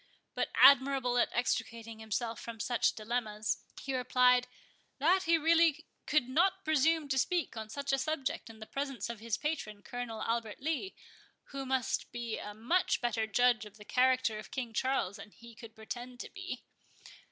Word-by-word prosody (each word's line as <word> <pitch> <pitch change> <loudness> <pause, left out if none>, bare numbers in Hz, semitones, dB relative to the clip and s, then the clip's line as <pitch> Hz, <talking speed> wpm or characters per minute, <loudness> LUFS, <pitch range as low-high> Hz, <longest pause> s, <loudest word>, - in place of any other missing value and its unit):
But, - - -1
admirable 265 -2 +6
at - - +3
extricating 230 -2 -2
himself 225 +1 -3
from 230 -1 -7
such 240 +3 +1
dilemmas, 215 -1 -2 0.2
he 270 -1 -3
replied, 250 0 +4 0.5
"that 360 +7 +3
he 330 0 +4
really 325 0 +3 0.2
could 295 -5 +2
not 370 +8 +2
presume 315 0 +3
to 265 -1 +2
speak 345 -1 0
on 220 -1 -6
such 280 +4 -3
a 270 - +2
subject 275 -4 -2
in 225 - -12
the 220 - -9
presence 275 -2 -3
of 235 - -9
his 225 0 -2
patron, 220 -10 -3
Colonel 245 -3 -5
Albert 230 -2 -2
Lee, 320 +6 -2 0.6
who 275 -1 -5
must 260 -2 -1
be 235 -2 -4
a 210 0 -7
much 345 - +1
better 240 -2 0
judge 240 +1 +3
of 210 0 -12
the 210 - -13
character 255 -3 +2
of 215 - -10
King 245 -4 -4
Charles 255 -5 0
than 200 - -10
he 235 +2 -15
could 225 0 -12
pretend 245 +3 -7
to - - -8
be." - - -6
245 Hz, 175 wpm, -32 LUFS, 225-280 Hz, 0.6 s, admirable